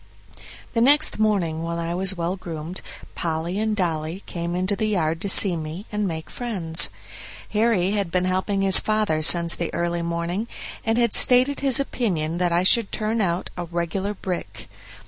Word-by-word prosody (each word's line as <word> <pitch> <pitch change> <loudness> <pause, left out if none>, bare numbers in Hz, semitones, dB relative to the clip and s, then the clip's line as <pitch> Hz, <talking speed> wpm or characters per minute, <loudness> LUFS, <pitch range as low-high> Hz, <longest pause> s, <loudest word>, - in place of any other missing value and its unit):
The 230 - +1
next 290 +1 +4
morning, 185 -7 0
when 170 0 -4
I 170 0 -3
was 190 +1 -1
well 170 +2 -2
groomed, 170 -1 -7 0.3
Polly 170 +3 -3
and 220 0 -1
Dolly 170 -1 -3
came 170 -1 -4
into 185 +2 +1
the 215 +1 -1
yard 165 -5 -1
to 200 - 0
see 190 -1 +5
me 160 +5 -6
and 210 -1 -1
make 160 -2 -6
friends. 180 -10 +1 0.6
Harry 210 -4 +1
had 200 -4 -1
been 180 +1 0
helping 190 +2 -1
his 195 -1 +7
father 215 -7 0
since 170 +1 +5
the 170 - -4
early 170 0 -1
morning, 170 +5 -3 0.4
and 225 +1 0
had 235 -3 +1
stated 255 +3 +5
his 270 -3 +4
opinion 175 - -2
that 180 -1 +1
I 170 +1 +2
should 215 +2 +4
turn 220 +1 -1
out 175 -2 -2
a 175 - -5
"regular 175 +4 -3
brick". 110 - -6
180 Hz, 175 wpm, -23 LUFS, 170-210 Hz, 0.6 s, his